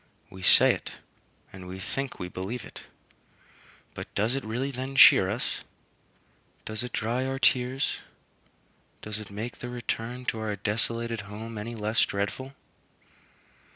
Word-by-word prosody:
We 95 - -10
say - - +7
it, - - -7 0.6
and 95 -1 -9
we 95 +1 -6
think 135 +8 -4
we 90 - -4
believe 95 +7 -5
it; - - -10 1.1
but - - -7
does 110 +4 +2
it 135 - -2
really 125 +6 -2
then 130 +1 -5
cheer 95 -7 +9
us? 110 +5 -2 1.0
Does 110 0 -1
it 125 - -4
dry 115 +4 0
our 135 0 -2
tears? 130 +1 +2 1.0
Does 105 0 -4
it 105 - -9
make 110 +4 -5
the 120 - -5
return 120 0 -3
to 110 - -1
our 110 -1 -2
desolated 115 +2 0
home 110 +2 -7
any 110 +3 -5
less 110 +1 +2
dreadful? 100 +7 -2
115 Hz, 145 wpm, -28 LUFS, 105-125 Hz, 1.1 s, cheer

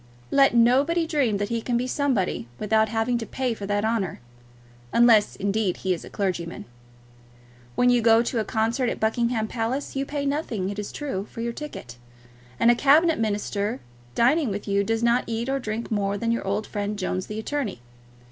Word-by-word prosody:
Let 275 -3 +4
nobody 275 +9 +4
dream 280 -10 +1
that 205 +1 -2
he 230 -1 -1
can 240 +1 0
be 245 - -1
somebody 255 - -1
without 220 +1 +2
having 230 +2 0
to 225 - -4
pay 255 -2 -2
for 205 -3 -7
that 205 +1 0
honour; 220 -7 -1 0.7
unless, 235 -3 +5
indeed, 200 -1 -1
he 185 -1 0
be 165 - -10
a - - -10
clergyman. 180 -4 -3 1.1
When 245 0 +4
you 245 -1 +3
go 225 0 +5
to 240 0 -1
a - - +1
concert 230 +4 0
at - - -4
Buckingham 225 0 0
Palace 245 +6 -3
you 270 - 0
pay 285 -1 -3
nothing, 240 -10 -2
it 205 - -6
is 205 - -5
true, 215 -9 -4
for 230 - -7
your 235 0 -2
ticket; 180 - -8 0.6
and 235 - +6
a - - +3
Cabinet 305 +5 +4
Minister 210 +1 -1 0.4
dining 270 +3 +3
with 205 +1 -5
you 200 0 +2
does 225 +3 -1
not 235 +1 +3
eat 230 +1 -2
or 270 +1 0
drink 225 -1 -4
more 200 -1 0
than 230 +2 -1
your 230 -4 -2
old 205 +2 -1
friend 205 0 -3
Jones 185 -1 -2
the 215 - -6
attorney. 225 - -3
225 Hz, 195 wpm, -25 LUFS, 205-250 Hz, 1.1 s, and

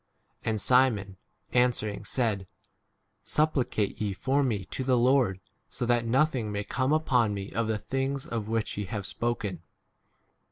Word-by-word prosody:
And 110 -1 0
Simon 110 -6 +3 0.4
answering 120 -4 +1
said, 105 -7 0 0.8
Supplicate 135 -10 0
ye 105 -2 0
for 135 +9 +1
me 105 -8 -1
to 130 - -4
the 130 -1 +3
Lord, 120 -6 +3 0.3
so 125 - -3
that 120 -1 +1
nothing 130 -3 +1
may 100 0 -2
come 130 +6 -1
upon 125 -9 +2
me 100 0 -5
of 115 0 -1
the 110 -1 0
things 135 +4 -2
of 115 -3 -4
which 110 -1 -2
ye 105 - -2
have 100 +1 -4
spoken. 105 -7 -3
115 Hz, 150 wpm, -28 LUFS, 105-130 Hz, 0.8 s, Simon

